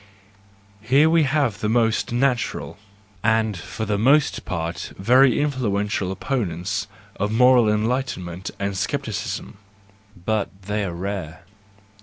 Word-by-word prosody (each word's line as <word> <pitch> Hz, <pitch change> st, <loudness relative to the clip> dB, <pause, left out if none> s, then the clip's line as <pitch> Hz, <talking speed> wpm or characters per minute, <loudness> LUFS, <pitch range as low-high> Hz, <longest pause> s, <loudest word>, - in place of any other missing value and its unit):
Here 135 Hz, +8 st, +4 dB
we 165 Hz, -2 st, +4 dB
have 135 Hz, -7 st, 0 dB
the 105 Hz, -, -1 dB
most 115 Hz, -1 st, +1 dB
natural, 125 Hz, -3 st, -1 dB, 0.4 s
and 110 Hz, -1 st, +2 dB
for 110 Hz, +5 st, -5 dB
the 105 Hz, -1 st, -1 dB
most 140 Hz, +6 st, +3 dB
part, 85 Hz, -2 st, -4 dB
very 125 Hz, +6 st, +4 dB
influential 105 Hz, -9 st, -1 dB
opponents 95 Hz, -, -2 dB, 0.3 s
of 105 Hz, +1 st, -1 dB
moral 125 Hz, -1 st, +5 dB
enlightenment 105 Hz, -5 st, -2 dB
and 100 Hz, 0 st, -2 dB
scepticism: 105 Hz, -1 st, -3 dB, 0.7 s
but 110 Hz, -1 st, 0 dB
they 105 Hz, +1 st, -2 dB
are 90 Hz, -, -3 dB
rare. 90 Hz, -3 st, -5 dB
110 Hz, 115 wpm, -23 LUFS, 100-125 Hz, 0.7 s, moral